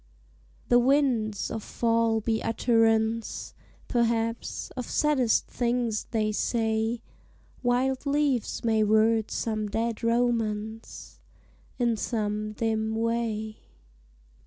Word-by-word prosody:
The 245 - +6
winds 245 -5 +1
of 225 - -3
fall 230 0 +1
be 220 0 0
utterance, 225 -1 +1 0.3
Perhaps, 230 -1 -1
of 250 -2 -6
saddest 270 -7 +2
things 240 -3 -1
they 215 -2 0
say; 225 +1 0 0.6
Wild 255 +3 0
leaves 280 -4 0
may 220 -2 +3
word 220 +1 +3
some 215 -2 -2
dead 225 +2 -2
romance 225 -2 -1 0.6
In 235 -3 +1
some 215 -1 -2
dim 220 0 -1
way. 225 -1 -2
225 Hz, 95 wpm, -27 LUFS, 220-240 Hz, 0.6 s, The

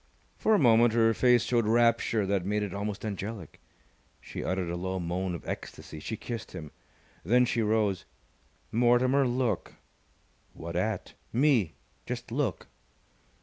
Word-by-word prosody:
For 220 - +3
a - - +5
moment 120 - +5
her 115 -1 +4
face 125 +1 +4
showed 115 -3 +1
rapture 115 -2 +3
that 95 -2 0
made 105 +2 0
it 100 -4 -4
almost 100 +1 -4
angelic. 100 -3 -6 0.6
She - - -7
uttered 95 -1 -1
a - - -2
low 95 +2 -3
moan 90 +1 -2
of 85 - -9
ecstasy. 80 - -7
She 110 +8 -5
kissed 115 0 -6
him. 75 -2 -7 0.5
Then 125 +7 +4
she 120 -1 0
rose. 105 -5 +1 0.7
"Mortimer, 125 +3 +3
look!" 120 -5 -1 0.8
"What 85 +1 -7
at?" 100 +2 -2 0.2
"Me. 120 - +2 0.3
Just 120 -1 -5
look!" 125 - -1
110 Hz, 145 wpm, -29 LUFS, 95-120 Hz, 0.8 s, a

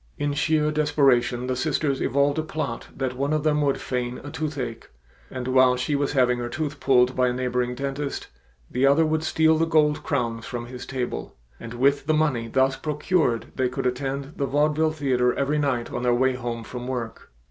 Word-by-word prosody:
In 145 0 -1
sheer 150 +1 +1
desperation 140 -5 +2
the 130 0 -1
sisters 140 0 0
evolved 140 +3 +2
a - - +2
plot 155 -6 -4
that 130 -2 -2
one 140 +3 -1
of 155 -1 0
them 150 -1 +2
would 140 -2 +1
feign 125 -1 -3
a 145 - -7
toothache, 140 -7 -4 0.4
and 130 -1 -5
while 130 -1 +5
she 125 +4 -1
was 145 0 0
having 125 -2 +3
her 120 0 -3
tooth 150 +1 -4
pulled 125 -1 +3
by 125 0 +3
a 125 - 0
neighboring 125 -1 -1
dentist 140 +1 -4 0.4
the 125 - -2
other 140 +4 +5
would 155 0 0
steal 160 0 +3
the 165 - +2
gold 150 -2 +3
crowns 115 -1 -2
from 120 -1 -5
his 125 0 -9
table, 130 -2 -4 0.2
and 115 +1 -8
with 140 +3 +2
the 155 - +3
money 140 -7 +1
thus 130 +3 +2
procured 150 -3 0
they 130 -1 0
could 125 - -4
attend 135 +3 -2
the 140 - -1
vaudeville 150 +3 +2
theater 130 -5 +1
every 145 +2 0
night 130 -5 -1
on - - -3
their 120 -1 +2
way 130 +1 +2
home 120 -2 -4
from 125 +1 -7
work. 120 -3 -5
135 Hz, 200 wpm, -24 LUFS, 125-150 Hz, 0.4 s, while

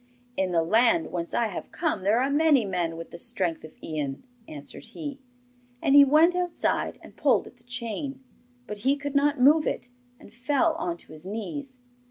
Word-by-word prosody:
'In 190 -1 0
the 165 -2 +2
land 240 - +3
whence 170 -1 -4
I 235 - +1
have 190 - -7
come 320 - -1
there 205 +5 +3
are 265 - +1
many 290 -5 +4
men 175 -4 -2
with 165 - -8
the - - -8
strength 190 -9 -2
of 155 - -12
Ian,' 145 -4 -4 0.2
answered 145 -2 -6
he. 280 +4 -7 0.6
And 275 - +2
he 285 0 +10
went 310 +5 +5
outside 360 -1 -1
and - - -14
pulled - - +2
at - - -14
the 240 - -28
chain, 250 +3 -5 0.4
but 210 -3 -7
he 270 +6 +2
could 285 0 -5
not 285 0 +2
move 300 +5 +5
it, - - -3 0.3
and 205 - -16
fell 285 +7 +1
on 340 +1 -2
to - - -13
his 155 +4 -11
knees. 260 +6 -5
250 Hz, 195 wpm, -26 LUFS, 190-290 Hz, 0.6 s, he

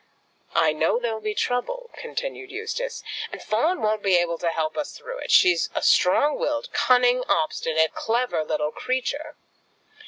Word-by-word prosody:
"I 160 -2 +4
know 155 +7 +1
there'll 230 -3 -3
be 215 0 -3
trouble," 470 - -2
continued 485 -4 -5
Eustace, 450 +5 -4 0.3
"and - - -7
Fawn 275 +10 0
won't 215 0 +1
be 190 -3 +4
able 170 -1 0
to 170 - 0
help 160 -1 -2
us 300 - -4
through - - -8
it. - - -7
She's 175 -2 +5
a - - -1
strong 285 +11 +4
willed, 295 -1 -2
cunning, 250 0 +3
obstinate, 160 - +1
clever 235 -7 0
little 150 -1 -1
creature. 260 - -3
235 Hz, 155 wpm, -24 LUFS, -, 0.3 s, She's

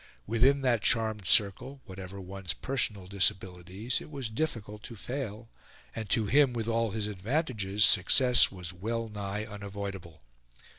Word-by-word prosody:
Within 130 +6 +3
that 120 -4 +2
charmed 110 -3 +1
circle, 125 +9 +2
whatever 95 -1 -8
one's 95 -2 -4
personal 110 -7 -2
disabilities, 95 +3 -1
it - - -11
was 135 -6 -5
difficult 110 -5 -3
to 115 - -9
fail; 115 -1 -5 0.5
and 110 -3 -5
to 115 -1 +2
him, 140 +3 +4
with 115 -2 -3
all 115 0 +1
his 110 0 -3
advantages, 105 - 0
success 125 +5 +5
was 90 -2 -6
well 115 +5 -3
nigh 105 0 -4
unavoidable. 100 - -7
105 Hz, 140 wpm, -29 LUFS, 95-120 Hz, 0.5 s, success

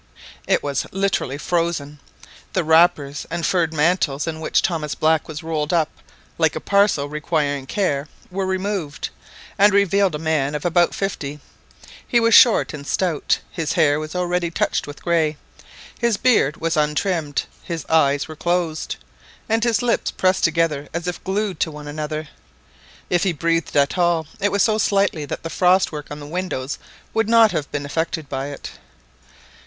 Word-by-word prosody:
It - - +2
was 140 -2 -2
literally 195 -8 -1
frozen. 160 -3 -2 0.5
The 185 - +1
wrappers 160 -3 +3
and 170 - -2
furred 170 -4 +1
mantles, 150 -2 +1
in 160 -1 -4
which 160 - +1
Thomas 155 -4 -1
Black 160 0 +2
was 155 +1 -7
rolled 155 -2 -2
up 160 -3 +2 0.5
like 160 -2 +2
a - - -2
parcel 200 -6 +2
requiring 145 -2 -1
care, 150 -7 -1 0.2
were 190 +1 -2
removed, 190 -5 -2 0.5
and 205 +1 +7
revealed 200 -3 +3
a - - -1
man 150 -2 0
of 150 - -4
about 175 0 +3
fifty. 150 -7 -3 0.7
He 240 - +3
was 230 -1 +3
short 235 -8 +6
and 140 -1 -8
stout, 175 -6 +1
his 160 -3 -2
hair 145 -1 +3
was 155 +2 -6
already 180 -1 0
touched 165 - -1
with 145 - -10
grey, 160 -3 +1 0.6
his 235 -3 +1
beard 210 - +3
was 165 0 -1
untrimmed, 150 0 0 0.2
his 165 -4 -5
eyes 145 -3 +3
were 155 - -8
closed, 170 -1 -1 0.5
and 225 +1 +1
his 235 -2 +2
lips 240 - +1
pressed 185 0 +1
together 160 -3 +1
as 170 0 -3
if 180 - -4
glued 195 -2 -2
to - - +1
one 150 -1 -9
another. 155 +1 -4 0.8
If 175 -1 +3
he 190 -3 +1
breathed 165 0 0
at 140 +5 +2
all, 170 -2 +2
it 205 0 +1
was 200 - +3
so 220 -1 +2
slightly 195 -7 +1
that - - -6
the 165 - -5
frost 185 +1 +3
work 150 -2 -7
on 145 - -7
the 145 - -8
windows 150 -5 -3 0.3
would 225 -1 +1
not 225 -2 +6
have 145 - -3
been 145 -1 -3
affected 160 +1 -2
by 135 0 -3
it. 145 - -7
165 Hz, 170 wpm, -21 LUFS, 150-185 Hz, 0.8 s, and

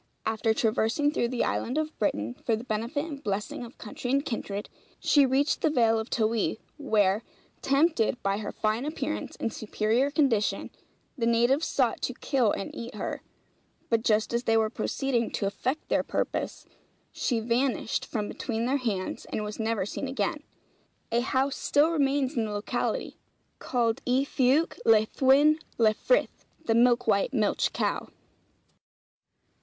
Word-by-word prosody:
After 220 0 +1
traversing 225 +6 +1
through 240 - 0
the 245 0 -1
island 250 +5 -1
of 310 0 -2
Britain, 115 - 0
for 230 - +2
the 220 - -6
benefit 235 +6 -2
and 290 -4 -8
blessing 210 +3 -3
of 235 +1 -11
country 240 +3 -6
and 275 +2 +2
kindred, 205 -4 -4 0.3
she 285 -2 +4
reached 275 +3 +1
the 315 - +3
Vale 230 -6 +3
of 220 - -5
Towy; 220 -1 0 0.2
where, 215 -7 +2 0.4
tempted 275 -4 +2
by 195 +1 0
her 215 - -4
fine 215 +3 -1
appearance 305 0 -4
and 225 - -3
superior 220 +5 0
condition, 270 -8 +1 0.4
the 230 -5 0
natives 240 +6 +3
sought - - +1
to - - -2
kill 250 -7 +1
and 195 - -4
eat 235 +1 -7
her; - - -4 0.7
but 230 -1 +3
just 220 0 +1
as 240 +1 0
they 225 0 +3
were 220 -1 +1
proceeding 235 +1 -1
to 200 - -1
effect 255 +9 -2
their - - +2
purpose, - - -3 0.5
she 240 -4 -1
vanished 235 +1 0
from 210 -2 -3
between 230 -2 -3
their 265 +3 +2
hands, 210 -8 -3
and 215 - -3
was 210 +1 -6
never 220 -3 0
seen 270 - -4
again. 295 +4 -2 0.7
A 235 - +3
house 265 +2 0
still 295 +3 +3
remains 280 -2 +1
in 230 -2 +1
the 215 - -4
locality, 205 0 -2 0.4
called 235 0 0
Y 260 +2 +3
Fuwch 275 +6 +2
Laethwen 265 +7 +4 0.2
Lefrith 230 - +1 0.2
(The 225 - +2
Milk 240 +1 +4
white 215 +5 +1
Milch 215 -4 +1
Cow.)' - - -2
235 Hz, 155 wpm, -28 LUFS, 220-275 Hz, 0.7 s, she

